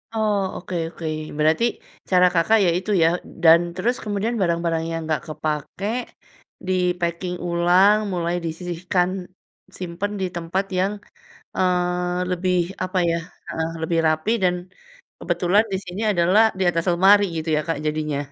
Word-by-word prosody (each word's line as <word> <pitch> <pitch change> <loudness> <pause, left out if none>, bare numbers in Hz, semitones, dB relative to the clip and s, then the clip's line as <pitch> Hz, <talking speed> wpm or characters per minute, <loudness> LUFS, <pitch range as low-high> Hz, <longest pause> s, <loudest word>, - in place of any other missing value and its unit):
Oh, 215 -2 +1 0.2
oke 180 0 -6
oke. 165 0 -9 0.3
Berarti 155 +7 +2 0.5
cara 180 -1 +5
Kakak 180 +6 +4
ya - - +4
itu 190 +4 -3
ya. - - +6 0.4
Dan 165 0 +8 0.2
terus 230 +7 0
kemudian 210 +2 -2
barang-barang 170 -2 0
yang 165 - -2
nggak 155 -1 0
kepakai 155 +7 -3 0.7
di-packing 180 -1 -1
ulang, 175 +4 +4 0.2
mulai 175 -1 -1
disisihkan, 175 +2 -1 0.7
simpan 180 +3 -4
di - - +1
tempat 170 +3 -1 0.2
yang, 190 +2 +1 0.6
eee, 180 0 0
lebih 180 0 0 0.3
apa 185 +1 -3
ya 165 - +1 0.3
heeh, 160 0 -2
lebih 165 +1 0
rapi 155 +7 +1
dan 180 -1 +3 0.6
kebetulan 195 +5 +2
di - - +1
sini 180 +3 -6
adalah 180 +4 +4 0.2
di - - 0
atas 165 -1 -1
lemari 195 +4 +6
gitu 160 0 -4
ya - - +2
Kak 165 -3 -1
jadinya. 150 -1 -1
180 Hz, 140 wpm, -22 LUFS, 165-185 Hz, 0.7 s, Dan